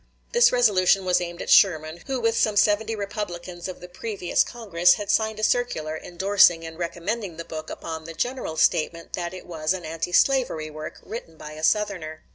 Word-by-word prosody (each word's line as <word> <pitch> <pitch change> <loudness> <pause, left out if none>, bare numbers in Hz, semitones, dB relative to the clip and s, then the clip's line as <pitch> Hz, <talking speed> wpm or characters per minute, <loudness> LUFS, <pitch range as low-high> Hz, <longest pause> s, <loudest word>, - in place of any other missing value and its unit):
This 480 0 +5
resolution 195 -6 +3
was 180 -1 +2
aimed 175 -1 -5
at - - -8
Sherman, 160 -3 +4
who 265 -1 -1
with 230 -1 +1
some 215 -2 +1
seventy 215 +2 +2
Republicans 185 -4 -5
of 185 - -8
the 180 - -9
previous 185 0 -1
Congress 180 -7 +2
had 205 -1 -2
signed 220 -1 +1
a - - -5
circular 185 -11 0
indorsing 175 -1 +3
and 160 0 -8
recommending 175 +2 -3
the 165 - -6
book 155 -1 -7
upon 160 -1 -6
the 165 0 -8
general 245 -6 -3
statement 165 0 +1
that 175 -1 -3
it 185 -1 -10
was 160 0 -1
an 180 -3 -7
anti 165 +2 -4
slavery 180 - +2
work, 155 0 -8
written 165 -8 -8
by 150 - -9
a 155 +1 -9
Southerner. 175 -5 0
180 Hz, 190 wpm, -24 LUFS, 165-210 Hz, -, This